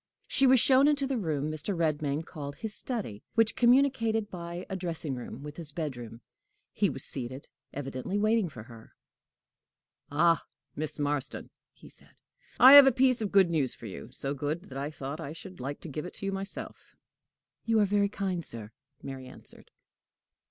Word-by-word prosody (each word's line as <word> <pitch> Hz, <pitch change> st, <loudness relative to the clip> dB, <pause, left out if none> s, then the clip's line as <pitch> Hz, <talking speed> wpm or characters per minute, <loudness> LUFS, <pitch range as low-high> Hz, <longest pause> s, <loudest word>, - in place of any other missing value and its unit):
She 270 Hz, -, +3 dB
was 260 Hz, 0 st, +6 dB
shown 270 Hz, +3 st, +5 dB
into 285 Hz, -2 st, +2 dB
the 265 Hz, -3 st, -1 dB
room 155 Hz, -5 st, -1 dB
Mr. 160 Hz, +5 st, -3 dB
Redmain 155 Hz, -1 st, 0 dB
called 145 Hz, -5 st, -7 dB
his 220 Hz, -2 st, -6 dB
study, 210 Hz, -, -5 dB
which 225 Hz, -1 st, +3 dB
communicated 235 Hz, -4 st, +3 dB
by 175 Hz, 0 st, -6 dB
a 190 Hz, -, -4 dB
dressing 165 Hz, -5 st, -4 dB
room 125 Hz, +1 st, -7 dB
with 150 Hz, 0 st, -8 dB
his 160 Hz, -3 st, -3 dB
bedroom. 125 Hz, -7 st, -6 dB, 0.5 s
He -, -, +2 dB
was -, -, -6 dB
seated, 130 Hz, +2 st, -7 dB, 0.2 s
evidently 135 Hz, +6 st, -4 dB
waiting 215 Hz, -2 st, +2 dB
for 110 Hz, -7 st, -10 dB
her. 115 Hz, -1 st, -15 dB, 1.1 s
"Ah, 165 Hz, +2 st, +3 dB, 0.3 s
Miss 155 Hz, 0 st, -4 dB
Marston!" 145 Hz, -2 st, -3 dB, 0.2 s
he -, -, -17 dB
said; -, -, -15 dB, 0.4 s
"I 260 Hz, +2 st, +10 dB
have 285 Hz, -1 st, +11 dB
a -, -, +7 dB
piece 255 Hz, -1 st, +3 dB
of 210 Hz, -, -2 dB
good 190 Hz, -4 st, +5 dB
news 145 Hz, -6 st, 0 dB
for -, -, -12 dB
you 110 Hz, +2 st, -8 dB
so 135 Hz, +2 st, -3 dB
good 150 Hz, +6 st, -4 dB
that 130 Hz, -, -6 dB
I 140 Hz, +2 st, -3 dB
thought 145 Hz, 0 st, -6 dB
I 145 Hz, 0 st, -6 dB
should 185 Hz, +2 st, -11 dB
like 140 Hz, +3 st, -5 dB
to -, -, -7 dB
give 150 Hz, +1 st, -5 dB
it 180 Hz, -, -9 dB
you 195 Hz, -, -1 dB
myself." 195 Hz, +1 st, -7 dB, 0.7 s
"You 225 Hz, -1 st, +3 dB
are 210 Hz, -, +5 dB
very 200 Hz, 0 st, +2 dB
kind, 190 Hz, -4 st, -2 dB
sir," 115 Hz, -5 st, 0 dB, 0.3 s
Mary 130 Hz, -1 st, -7 dB
answered. 130 Hz, -, -12 dB
165 Hz, 180 wpm, -29 LUFS, 140-210 Hz, 1.1 s, have